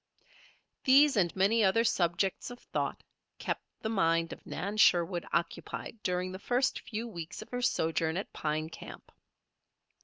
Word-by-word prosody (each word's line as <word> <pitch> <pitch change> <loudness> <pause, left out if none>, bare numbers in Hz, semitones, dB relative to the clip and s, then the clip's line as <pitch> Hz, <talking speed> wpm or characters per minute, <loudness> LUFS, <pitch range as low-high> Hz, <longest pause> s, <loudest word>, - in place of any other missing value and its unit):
These, 275 +2 +6
and 180 -5 +2
many 205 +4 +3
other 210 +4 +4
subjects 185 -2 0
of 245 - -8
thought, - - -3 0.3
kept - - -3 0.2
the 220 - -2
mind 165 -5 +1
of - - -13
Nan 200 +3 -4
Sherwood 175 -3 +4
occupied 170 +6 -3
during 180 -1 -1
the 185 - -7
first 250 +5 +1
few 225 +2 -5
weeks 175 -2 -7
of - - -21
her 245 0 -3
sojourn 160 -6 +1
at 195 - -5
Pine 155 +1 -2
Camp. - - -11
190 Hz, 150 wpm, -31 LUFS, 170-225 Hz, 0.3 s, These